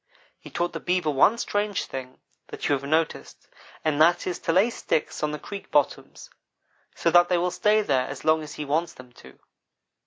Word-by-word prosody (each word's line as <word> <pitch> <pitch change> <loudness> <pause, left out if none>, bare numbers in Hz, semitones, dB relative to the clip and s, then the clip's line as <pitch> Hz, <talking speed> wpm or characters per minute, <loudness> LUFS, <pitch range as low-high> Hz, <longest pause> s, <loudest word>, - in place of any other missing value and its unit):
He - - -12
taught 175 0 -2
the - - -4
Beaver 175 -3 0
one 150 +11 +4
strange 205 -3 -2
thing 130 -1 -8 0.3
that - - -5
you - - +2
have 140 -1 -1
noticed, 155 +3 -2 0.4
and 155 -1 +1
that 175 +2 +4
is 180 - -3
to - - -1
lay 195 +8 +3
sticks 155 - -2
on 150 - 0
the 150 - -4
creek 200 +6 -9
bottoms, 145 -2 -1 0.6
so 170 - +1
that 175 +1 +5
they 180 - +2
will 180 +1 0
stay 215 +3 +2
there 130 -7 +1
as 135 0 -8
long 155 0 +3
as 150 -1 -9
he 150 - -5
wants 160 +4 -1
them 125 -1 -14
to. 65 - -16
160 Hz, 205 wpm, -25 LUFS, 145-180 Hz, 0.6 s, that